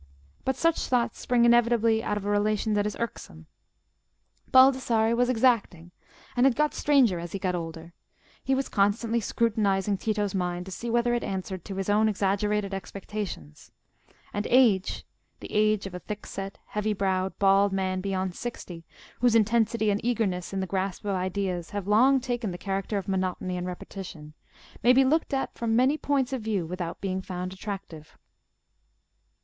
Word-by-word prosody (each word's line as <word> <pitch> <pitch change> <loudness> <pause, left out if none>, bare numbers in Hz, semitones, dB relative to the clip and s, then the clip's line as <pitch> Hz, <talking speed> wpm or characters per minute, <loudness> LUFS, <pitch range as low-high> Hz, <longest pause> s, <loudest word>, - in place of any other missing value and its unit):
But 265 - 0
such 330 +4 +1
thoughts 245 -2 0
spring 240 -1 +2
inevitably 235 -1 +4
out 210 -2 -2
of 205 - -5
a - - -1
relation 210 +1 +1
that 205 0 +1
is 210 - -5
irksome. 80 - -6 1.1
Baldassarre 255 -4 +5
was 245 +1 +2
exacting, 225 -9 +1 0.4
and 250 +2 +5
had 260 - +2
got 300 0 +1
stranger 260 -11 +3
as 170 0 -7
he - - -1
got 185 -1 -1
older: 165 -1 -6 0.5
he 265 - +1
was 270 0 -1
constantly 220 +3 +1
scrutinising 205 -3 0
Tito's 210 -3 -1
mind 180 -1 -2
to 190 - -9
see 235 +6 -5
whether 240 +1 +2
it 240 - 0
answered 190 -2 -4
to 195 - -6
his 195 0 -3
own 215 +1 +3
exaggerated 205 0 0
expectations; 195 - -7 0.6
and 205 - -2
age—the 230 -7 0
age 215 -1 +2
of 195 - -7
a 180 - -5
thickset, 195 -1 -6
heavy 210 0 -2
browed, 190 -1 -1
bald 195 0 +4
man 190 -1 -1
beyond 190 -1 -2
sixty, 180 -7 -7 0.4
whose 245 -2 +3
intensity 220 0 +2
and 200 - -2
eagerness 205 -7 -1
in 195 -1 -2
the - - -1
grasp 190 +2 -3
of 200 - 0
ideas 185 -2 -2
have 205 -2 -5
long 255 +6 +5
taken 245 -3 -3
the 175 - -5
character 195 +2 -2
of 195 - -4
monotony 185 -1 -2
and 180 0 -3
repetition, 175 -4 -8 0.5
may 245 - +6
be 265 +1 +5
looked 315 +5 +1
at 270 -1 -1
from 225 -1 -1
many 260 +5 +4
points 275 -4 0
of 260 - -2
view 210 -5 -1
without 175 0 -5
being 190 -1 -2
found 185 0 -5
attractive. 190 -6 -8
205 Hz, 165 wpm, -27 LUFS, 190-235 Hz, 1.1 s, may